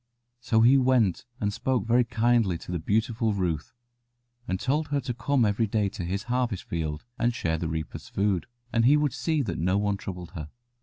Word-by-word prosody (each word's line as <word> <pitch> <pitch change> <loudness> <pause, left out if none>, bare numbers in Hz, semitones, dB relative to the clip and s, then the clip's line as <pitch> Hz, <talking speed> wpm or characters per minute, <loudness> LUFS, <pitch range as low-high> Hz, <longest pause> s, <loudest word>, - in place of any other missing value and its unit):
So 115 -2 +2
he 130 +4 +6
went 125 -7 +2
and 105 -1 -1
spoke 130 +2 0
very 120 +2 +4
kindly 115 -6 +2
to 85 - -9
the 90 - -1
beautiful 110 +4 0
Ruth, 85 -5 -2 0.8
and 95 - -1
told 145 +6 0
her 145 0 0
to 125 -2 -3
come 125 +1 +1
every 105 +2 +1
day 105 -1 +1
to 95 - -6
his 95 +4 -2
harvest 120 -4 -1
field 80 -1 -4
and 120 0 +1
share 80 -5 -1
the 85 - -2
reapers' 80 -1 -5
food, 100 -3 0 0.3
and 115 -1 +3
he 145 +4 +6
would 150 -3 +1
see 155 -3 0
that 90 -8 -3
no 90 +4 +2
one 100 -1 0
troubled 90 -3 -7
her. 75 -4 -7
110 Hz, 200 wpm, -27 LUFS, 90-125 Hz, 0.8 s, he